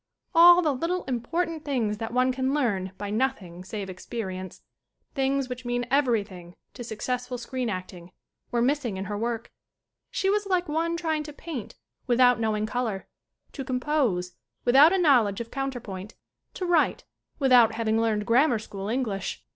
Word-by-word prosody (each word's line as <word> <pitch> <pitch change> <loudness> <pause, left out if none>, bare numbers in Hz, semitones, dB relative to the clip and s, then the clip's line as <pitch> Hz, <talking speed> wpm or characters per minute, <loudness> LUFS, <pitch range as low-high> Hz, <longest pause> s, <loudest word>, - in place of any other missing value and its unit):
All 350 +1 +8
the 300 -3 +2
little 340 +7 -2
important 315 +6 -2
things 230 -8 -1
that 225 0 -4
one 255 +1 +2
can 260 +2 -1
learn 200 -10 0
by 205 0 -5
nothing 210 -7 -2
save 195 +1 -5
experience, 185 -1 -6 0.5
things 270 -1 0
which 250 -1 -6
mean 245 0 -1
everything 205 -10 0 0.2
to 245 - -8
successful 250 +3 -3
screen 245 0 -3
acting, 185 -2 -6 0.4
were 235 -1 +1
missing 255 -6 0
in 190 - -4
her 205 - -4
work. 230 +1 -3 0.6
She 385 - -1
was 410 +1 +1
like 365 -2 +1
one 330 +2 -1
trying 320 -2 -1
to 300 0 -8
paint 295 -7 -7 0.3
without 245 0 +4
knowing 215 -1 0
color, 220 -4 -3 0.4
to 270 - -6
com 255 -1 -2
pose 240 -12 0 0.3
without 275 +6 +7
a 385 - +2
knowledge 250 - +4
of 230 -1 -6
counter 270 -2 -3
point, 195 -1 -8 0.4
to 370 - -3
write 345 -3 +2 0.3
without 250 -5 +5
having 225 0 +1
learned 215 -2 0
grammar 245 +3 +4
school 200 -2 -7
English. 220 -6 -3
245 Hz, 165 wpm, -26 LUFS, 210-280 Hz, 0.6 s, All